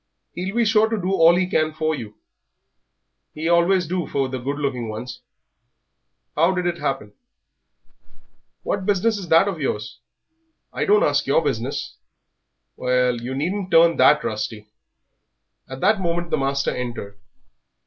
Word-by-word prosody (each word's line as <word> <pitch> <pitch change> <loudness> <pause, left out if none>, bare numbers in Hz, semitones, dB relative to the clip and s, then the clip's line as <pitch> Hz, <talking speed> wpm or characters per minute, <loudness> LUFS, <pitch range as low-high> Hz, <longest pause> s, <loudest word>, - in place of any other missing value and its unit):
"He'll 185 +4 -4
be 235 -1 +2
sure 220 +1 +3
to 225 -1 -1
do 185 0 -2
all 170 -2 +5
he 185 +1 +1
can 155 -4 0
for 155 0 0
you 110 -7 -7 1.2
he 155 +2 -3
always 170 +2 +3
do 175 0 -3
for 135 -2 -1
the 130 0 -4
good 140 +3 -3
looking 130 -6 -3
ones. 120 +3 -7 1.1
How 170 +5 +3
did 180 -1 -2
it 175 -1 -1
all - - -14
happen?" 105 -6 -3 1.5
"What 195 -2 -2
business 205 +2 +1
is 185 - -8
that 165 +5 +5
of 180 -6 -3
yours? 105 -4 -3 0.7
I - - -1
don't 210 +1 +4
ask 145 -1 +1
your 140 +4 +3
business." 135 0 -3 0.8
"Well, 125 -1 0
you 125 +2 -5
needn't 185 +7 -2
turn 165 -1 +5
that 150 0 +5
rusty." 105 0 -4 1.0
At 130 0 -8
that 200 +1 +3
moment 170 -1 -2
the - - +2
master 140 0 0
entered. 115 -5 -6
155 Hz, 155 wpm, -22 LUFS, 130-185 Hz, 1.5 s, all